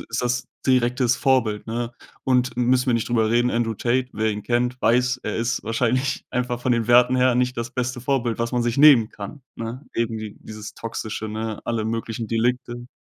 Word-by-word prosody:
ist 115 +2 -1
das 125 0 0 0.2
direktes 125 -1 +3
Vorbild, 115 -6 +1
ne? 120 +1 -3 0.3
Und 125 -2 +1
müssen 125 +1 +2
wir 125 - +3
nicht 115 - -1
drüber 110 -2 +2
reden, 120 +1 +3
Andrew 115 -1 0
Tate, 125 +3 0
wer 110 0 0
ihn 105 0 -5
kennt, 125 +2 0
weiß, 125 +2 +2
er 105 - -3
ist 115 +1 -1
wahrscheinlich 125 +4 0
einfach 125 -1 -2
von 125 0 +1
den 115 -1 0
Werten 125 +1 +6
her 125 -1 +3
nicht 125 0 +1
das 115 0 -3
beste 125 -1 -3
Vorbild, 125 -3 -1
was 115 0 -1
man 125 -1 0
sich 120 -1 -1
nehmen 140 -6 +7
kann, 105 +8 -9
ne? 115 +5 -6
Eben 115 -1 -1
d 110 -1 -7
dieses 110 -1 -9
Toxische, 110 -1 -5
ne? 110 0 -4
Alle 115 -2 -1
möglichen 115 0 -3
Delikte. 120 +1 -1
120 Hz, 200 wpm, -23 LUFS, 115-125 Hz, 0.3 s, nehmen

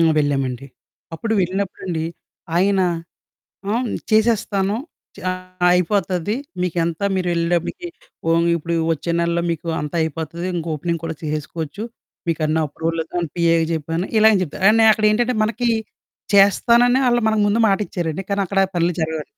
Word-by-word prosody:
ఆ! - - +5 0.2
వెళ్ళామండి. 135 -3 -1 0.5
అప్పుడు 225 +7 -3
వెళ్ళినప్పుడండి, 185 -3 -2 0.5
ఆయన 195 +2 +3 0.9
ఆహ్, 245 +2 0
న్ - - -2
చేసేస్తాను, 215 -3 +2 0.4
చ - - -12 0.5
అయిపోతది, 180 +2 +1 0.3
మీకెంత 170 -2 -1 0.2
మీరెళ్ళేటప్పుడికి. 175 - -1 0.4
ఓహ్! 165 0 +4
మీకిప్పుడు 170 0 0 0.2
ఒచ్చే 165 +2 -4
నెల్లో 170 0 +1
మీకూ 165 0 -3
అంతా 150 +2 -5
అయిపోతది 160 +2 -4
ఇంకోపెనింగ్ 165 0 -2
కూడా 165 -1 -3
చేసేసుకోవచ్చు. 155 +4 -4 0.5
మీకన్నీ 155 -1 0
అప్రూవలది 165 +2 -3
అని 170 - -3
పిఏకి 165 -1 +3
జెప్పాను, 165 +2 -2
ఇలా 220 +1 +7
అని 200 - +3
చెప్తారు, 180 +3 -7
కానీ 220 +1 +5
నే - - +6
అక్కడేంటంటే, 220 +3 +2
మనకీ 235 +2 0 0.6
చేస్తానని 235 +5 +5
ఆళ్ళు 240 -1 +3
మనకు 220 -1 +2
ముందు 210 +3 +1
మాటిచ్చారండి, 195 -4 -1
కానీ 200 0 +1
అక్కడా 195 +1 +2
పనులు 175 +1 +2
జరగవండి. 160 -1 -2
175 Hz, 135 wpm, -20 LUFS, 165-205 Hz, 0.9 s, ఇలా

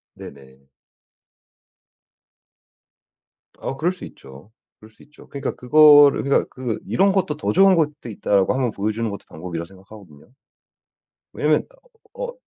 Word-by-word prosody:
네네. 65 -1 -14 3.0
어 135 - -5
그럴 170 +5 0
수 185 - -10
있죠. 70 +9 -15 0.3
그럴 110 - -16
수 110 - -21
있죠. 150 - -19
그러니까 140 - -5
그거를 145 +1 +6
그러니까 140 0 +1
그 125 -4 -5
'이런 195 +1 +2
것도 170 -6 -1
더 - - -2
좋은 195 0 +5
것도 150 -6 -2
있다.'라고 100 -1 0
한번 130 -3 -1
보여주는 110 +3 -3
것도 100 - -9
방법이라 85 +1 -7
생각하거든요. 95 - -17 1.0
왜냐면 - - 0 0.5
어 - - -6
125 Hz, 290 characters per minute, -21 LUFS, 95-150 Hz, 3.0 s, 그거를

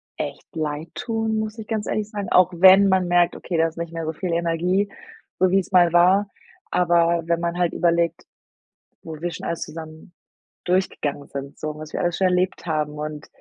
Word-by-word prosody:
echt 145 -2 -6
leid 155 0 -3
tun, 225 -1 -2
muss 215 +1 -4
ich 220 -1 -8
ganz 215 -2 -2
ehrlich 215 -1 -2
sagen, 205 -2 -5
auch 180 0 +5
wenn 190 +3 +7
man 190 -1 +2
merkt: 175 -1 +3
„Okay, 175 - -4
da 165 0 +3
ist 165 - -10
nicht 170 -1 -5
mehr 165 -1 -4
so 160 - -3
viel 175 +2 -4
Energie, 170 +4 0 0.5
so 185 0 +3
wie 195 - +4
es 190 - -6
mal 175 -2 +6
war.“ 185 +4 +4 0.4
Aber 170 -1 +2
wenn 170 0 0
man 170 0 -2
halt 175 -1 +1
überlegt, 170 -1 +1 0.8
wo 160 - -7
wir 175 +1 -2
schon - - -7
alles 170 - -3
zusammen 160 +2 -9 0.5
durchgegangen 150 -6 -1
sind, 140 0 -7
so, 155 0 -4
was 155 0 -9
wir - - -2
alles 175 -1 -1
schon 190 - +3
erlebt 180 0 0
haben 150 -2 -1
und 150 0 -6
170 Hz, 200 wpm, -23 LUFS, 160-185 Hz, 0.8 s, wenn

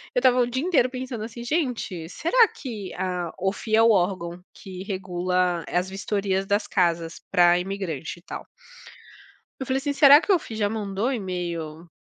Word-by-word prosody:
eu - - +4
estava 255 - +4
o 245 - +3
dia 260 +3 -2
inteiro 320 -8 +3
pensando 255 -3 -5
assim: 235 +1 -8
"Gente, 240 - -2
será 445 - +3
que, 215 - -7
a" 180 -2 -3
OFII 195 +4 -1
é 225 - +5
o 230 - +6
órgão 180 -3 0
que 185 -1 -9
regula 180 -2 -1
as 180 +1 -1
vistorias 195 0 -1
das 205 +1 +1
casas 170 -2 0
para 175 0 +5
imigrante 180 -4 -5
e - - -25
tal - - -8 1.1
eu 265 - -4
falei 260 +1 0
assim: 285 +1 -2
"Será 285 0 +8
que 410 - -5
o 385 - +7
OFII 230 -9 -7
já 210 -2 +1
mandou 205 -1 -2
o - - 0
e-mail 175 - -4
195 Hz, 180 wpm, -24 LUFS, 180-245 Hz, 1.1 s, Será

